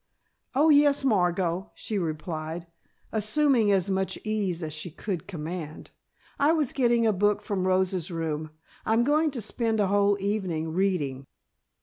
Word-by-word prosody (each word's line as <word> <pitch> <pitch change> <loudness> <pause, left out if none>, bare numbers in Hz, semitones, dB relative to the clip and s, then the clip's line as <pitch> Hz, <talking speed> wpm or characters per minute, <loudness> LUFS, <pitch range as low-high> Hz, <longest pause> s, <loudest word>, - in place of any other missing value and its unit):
"Oh, 305 +4 +5
yes, 290 -1 +5
Margot," 180 -5 +1
she 210 -2 -3
replied, 160 0 -4 0.5
assuming 225 +1 +2
as 190 -2 +2
much 190 0 -1
ease 200 -6 -1
as 155 -1 -4
she 155 +3 -5
could 175 +1 -5
command, 165 -3 -6 0.5
"I 290 +3 +4
was 305 -6 +1
getting 240 -3 +3
a 220 - +3
book 205 +2 +1
from 190 -3 -1
Rosa's 185 -2 +1
room. 160 -2 -3 0.3
I'm 225 +2 +2
going 305 +4 +3
to 260 -5 -5
spend 225 +1 -1
a 205 - +3
whole 200 +1 +3
evening 185 -6 -2
reading." 150 -8 -1
195 Hz, 145 wpm, -27 LUFS, 170-225 Hz, 0.5 s, Oh